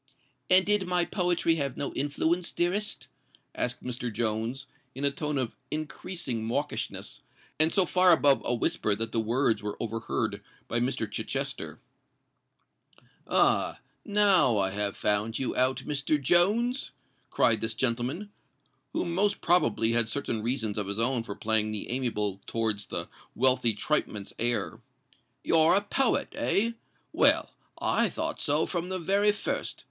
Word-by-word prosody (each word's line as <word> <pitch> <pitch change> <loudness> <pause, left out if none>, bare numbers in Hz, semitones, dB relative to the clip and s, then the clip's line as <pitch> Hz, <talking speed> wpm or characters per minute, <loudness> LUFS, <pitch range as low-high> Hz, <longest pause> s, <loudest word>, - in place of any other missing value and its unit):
"And 185 +1 +6
did 205 -2 +1
my 180 -1 +2
poetry 175 -3 +1
have 140 -3 -2
no 140 - -3
influence, 160 +5 -1
dearest?" 195 +5 -1 0.5
asked 125 0 -3
Mr. 125 -1 -4
Jones, 115 +4 -2 0.3
in 140 +2 -2
a 140 - +4
tone 150 +1 -3
of 125 -4 -2
increasing 150 -5 -4
mawkishness, 140 +6 -3 0.4
and 160 +1 +6
so 190 -3 +3
far 180 +1 +5
above 140 -3 +4
a 120 - 0
whisper 110 -2 0
that 115 +1 -4
the 115 - 0
words 115 +2 +1
were 105 0 -5
overheard 115 0 -3 0.3
by 120 - -1
Mr. 120 -2 -1
Chichester. 105 - -4 1.5
"Ah! - - +2 0.2
now 200 - +4
I 95 -1 +1
have 100 0 -2
found 105 +2 +1
you 130 - -2
out, 130 +1 +1
Mr. 150 +1 0
Jones!" 210 - +2 0.4
cried 110 -2 +2
this 110 0 -2
gentleman, 130 - -1 0.6
who - - -1
most 190 +4 0
probably 135 -10 +2
had 115 -1 +3
certain 115 -3 -2
reasons 115 -3 -1
of 100 - -3
his 100 +2 -3
own 120 +1 +1
for 105 -3 -7
playing 110 -1 +1
the 110 +1 -4
amiable 105 -6 -1
towards 110 -3 -2
the - - -4 0.3
wealthy 125 -3 +3
tripeman's 105 -6 -2
heir: 120 +1 0 0.6
"you're 165 +1 +4
a 200 - +3
poet—eh? 230 -1 0 0.4
Well—I - - +2
thought - - -4
so 150 +1 +1
from 175 0 -3
the 185 - -2
very 200 +4 +2
first. 205 - -3
130 Hz, 140 wpm, -28 LUFS, 115-175 Hz, 1.5 s, And